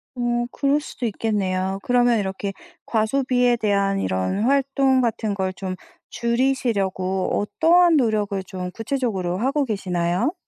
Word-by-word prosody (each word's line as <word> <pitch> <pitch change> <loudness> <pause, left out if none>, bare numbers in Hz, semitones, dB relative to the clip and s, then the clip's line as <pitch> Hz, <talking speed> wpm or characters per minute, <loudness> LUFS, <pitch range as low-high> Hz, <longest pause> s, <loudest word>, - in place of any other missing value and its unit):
어 240 -1 0
그럴 280 +1 +1
수도 260 -4 -6
있겠네요. 195 -3 -1
그러면 245 -2 +3
이렇게 195 0 -3 0.3
과소비에 245 +2 +2
대한 200 -2 +1
이런 95 - -1
활동 270 0 +2
같은 225 -3 -1
걸 190 -1 -2
좀 185 0 -5 0.3
줄이시려고 225 -7 0
어떠한 335 +9 +4
노력을 210 -6 0
좀 185 -1 -6
구체적으로 215 -6 -2
하고 275 +5 +1
계시나요? 185 - -1
220 Hz, 300 characters per minute, -22 LUFS, 190-255 Hz, 0.3 s, 어떠한